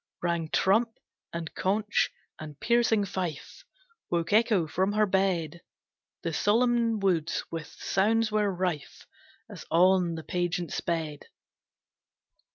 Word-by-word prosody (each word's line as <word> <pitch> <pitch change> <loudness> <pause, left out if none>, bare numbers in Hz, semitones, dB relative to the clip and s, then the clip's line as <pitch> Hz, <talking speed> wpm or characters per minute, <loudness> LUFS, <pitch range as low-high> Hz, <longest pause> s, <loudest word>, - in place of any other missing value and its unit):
Rang 170 -2 -1
trump, 225 +7 +2 0.3
and 170 -1 -5
conch, 210 +2 0 0.3
and 150 -2 -9
piercing 230 -3 +2
fife, 180 - -5 0.5
Woke 170 +2 -1
Echo 215 -5 +4
from 190 +6 0
her 215 0 +3
bed! 185 -4 0 0.6
The 165 - -2
solemn 230 +4 +2
woods 175 -5 0
with 165 -2 -5
sounds 220 +3 0
were 210 -1 +2
rife 180 -5 -3 0.4
As - - -10
on 180 0 +4
the 160 - -6
pageant 175 0 -2
sped. 160 -4 -3
185 Hz, 115 wpm, -28 LUFS, 170-210 Hz, 0.6 s, Echo